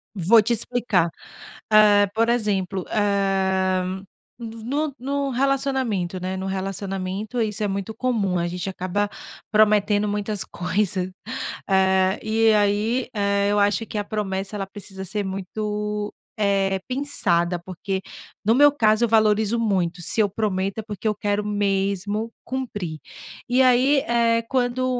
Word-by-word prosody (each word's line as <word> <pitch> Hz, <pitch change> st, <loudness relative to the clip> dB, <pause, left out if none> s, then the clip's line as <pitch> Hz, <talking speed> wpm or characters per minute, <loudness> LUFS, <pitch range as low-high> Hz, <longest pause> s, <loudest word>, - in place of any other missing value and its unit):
Vou 205 Hz, +5 st, +5 dB
te 235 Hz, +2 st, +1 dB
explicar. 225 Hz, -7 st, +1 dB, 0.6 s
Eh, 210 Hz, -1 st, +6 dB
por 230 Hz, +1 st, +2 dB
exemplo, 195 Hz, -5 st, 0 dB
eh, 190 Hz, -2 st, +1 dB, 0.6 s
no 230 Hz, -1 st, -6 dB
v 220 Hz, -, -10 dB
no 285 Hz, +2 st, -1 dB
no 280 Hz, +2 st, -2 dB
relacionamento, 260 Hz, -8 st, 0 dB
né, 185 Hz, +1 st, -3 dB
no 190 Hz, -, -4 dB
relacionamento 195 Hz, +3 st, -3 dB
isso 215 Hz, -1 st, -2 dB
é -, -, +1 dB
muito 200 Hz, +2 st, -3 dB
comum, 220 Hz, -7 st, 0 dB
a 170 Hz, -, 0 dB
gente 180 Hz, +2 st, -4 dB
acaba 190 Hz, +2 st, -2 dB, 0.4 s
prometendo 210 Hz, -1 st, +3 dB
muitas 205 Hz, 0 st, -2 dB
coisas. 185 Hz, 0 st, -1 dB, 0.6 s
É, 190 Hz, 0 st, +3 dB
e 220 Hz, 0 st, +3 dB
aí, 210 Hz, +4 st, +1 dB
eh, 200 Hz, -1 st, +1 dB
eu 205 Hz, -, +2 dB
acho 205 Hz, +2 st, +2 dB
que -, -, -5 dB
a 205 Hz, -, 0 dB
promessa, 195 Hz, -1 st, -3 dB
ela 195 Hz, -1 st, -4 dB
precisa 195 Hz, -1 st, -9 dB
ser 205 Hz, +3 st, -2 dB
muito, 210 Hz, +2 st, -3 dB, 0.3 s
eh, 195 Hz, -2 st, +1 dB
pensada, 185 Hz, -11 st, +1 dB
porque, 190 Hz, +2 st, -4 dB, 0.4 s
no 225 Hz, -, +4 dB
meu 290 Hz, +2 st, +7 dB
caso, 220 Hz, -4 st, +3 dB
eu 230 Hz, -, -3 dB
valorizo 220 Hz, 0 st, +3 dB
muito, 185 Hz, -5 st, 0 dB
se 175 Hz, -, -1 dB
eu 205 Hz, -, +3 dB
prometo, 195 Hz, -1 st, -2 dB
é -, -, -4 dB
porque 210 Hz, 0 st, -5 dB
eu 210 Hz, -, +1 dB
quero 205 Hz, 0 st, -1 dB
mesmo 205 Hz, +1 st, -1 dB, 0.2 s
cumprir. 205 Hz, -11 st, -4 dB, 0.5 s
E 250 Hz, +2 st, +4 dB
aí, 260 Hz, +3 st, +4 dB
eh, 230 Hz, -1 st, +2 dB
quando 255 Hz, -1 st, 0 dB
205 Hz, 145 wpm, -23 LUFS, 190-225 Hz, 0.6 s, meu